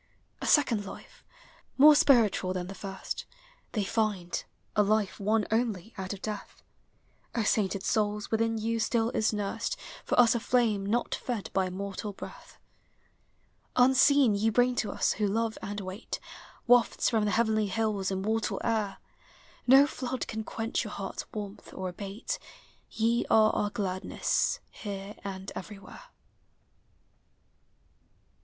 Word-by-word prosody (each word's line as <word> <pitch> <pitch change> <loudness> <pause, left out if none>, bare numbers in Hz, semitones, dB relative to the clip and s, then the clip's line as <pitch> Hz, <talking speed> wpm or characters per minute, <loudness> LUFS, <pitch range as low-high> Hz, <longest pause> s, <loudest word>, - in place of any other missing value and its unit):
A - - -3
second 240 -8 +4
life, 195 - -11 0.5
more 300 +3 +9
spiritual 225 -10 +4
than 180 -1 -3
the 190 - -7
first, 195 -1 -6 0.5
They 210 - 0
find, 200 -4 -1 0.2
— - - -41
a 210 - +5
life 210 -1 +1
won 210 +2 +2
only 220 -2 -1
out 190 -3 -5
of 200 -2 -7
death. 210 -2 -6 0.7
O 230 - +1
sainted 200 -2 +1
souls, 210 -1 0
within 225 0 +1
you 225 +1 -1
still 225 +1 +1
is 220 - +1
nursed 205 -2 -2 0.3
For - - 0
us 240 -2 +7
a 235 - -1 0.2
(lame 215 -5 +2
not 235 +4 0
fed 235 -6 -4
by 190 -1 +1
mortal 200 +2 -5
breath. - - -11 1.2
Unseen, 265 -1 +5
ye 210 +2 +2
bring 245 +3 +3
to 215 - 0
us, - - +1
who 210 - 0
love 225 +2 0
and 205 +1 -4
wait, 190 +3 -6 0.5
Wafts 245 -1 +4
from 220 -3 +2
the - - +1
heavenly 220 -1 +2
hills, 210 -2 -1
immortal 210 +4 -1
air; 215 -4 0 0.7
No 270 +3 +8
Hood 260 -2 -4
can 220 0 -4
quench 225 +1 -2
your 210 - -7
hearts' 195 -1 -5
warmth, 205 -2 -7
or 190 - -3
abate; 200 +5 -5 0.5
Ye 230 +2 +1
are 215 0 +6
our 205 - 0
gladness, 190 -4 -1
here 200 -1 -6
and 195 -1 -6
everywhere. 200 - -9
215 Hz, 140 wpm, -29 LUFS, 195-230 Hz, 1.2 s, more